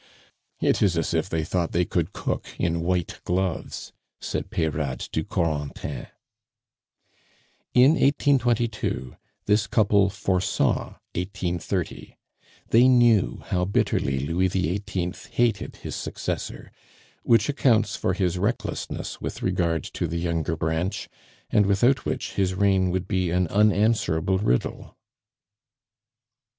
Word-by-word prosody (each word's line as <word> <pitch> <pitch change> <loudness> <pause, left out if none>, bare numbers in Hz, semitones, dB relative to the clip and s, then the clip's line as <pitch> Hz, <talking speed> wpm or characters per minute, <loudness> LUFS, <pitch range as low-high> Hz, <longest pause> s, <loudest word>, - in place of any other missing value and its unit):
"It - - +2
is 95 -5 +3
as 80 - 0
if 80 +3 0
they 80 -1 -1
thought 85 +1 -1
they 90 +1 +2
could - - -1
cook - - -3
in 85 -1 0
white 90 0 -1
gloves," 90 -1 -2 0.3
said - - -4
Peyrade 75 -5 -1
to - - -3
Corentin. 75 -4 -3 1.7
In 125 +3 +7
1822 120 - +1 0.3
this 105 -1 +2
couple 100 -1 +3
foresaw 95 0 0 0.2
1830. 90 -1 -3 0.5
They 120 +3 +6
knew 120 -6 +4
how 90 -1 0
bitterly 70 -8 0
Louis 85 +6 +1
XVIII. 90 0 -2 0.2
hated 120 -1 +1
his - - -7
successor, - - -5 0.5
which 115 -1 +3
accounts 125 -8 +2
for 95 - -1
his 90 -2 0
recklessness 105 +7 -3
with - - -5
regard 85 -3 0
to 85 - -3
the 85 +2 -3
younger 85 -1 -1
branch, 80 +4 -2 0.4
and 105 -2 +4
without 120 +7 +3
which - - -3
his 95 -2 0
reign 95 -1 +3
would 90 +1 -2
be 95 -3 0
an 90 +2 +2
unanswerable 105 -3 +2
riddle. 60 -11 -1
95 Hz, 115 wpm, -25 LUFS, 85-105 Hz, 1.7 s, In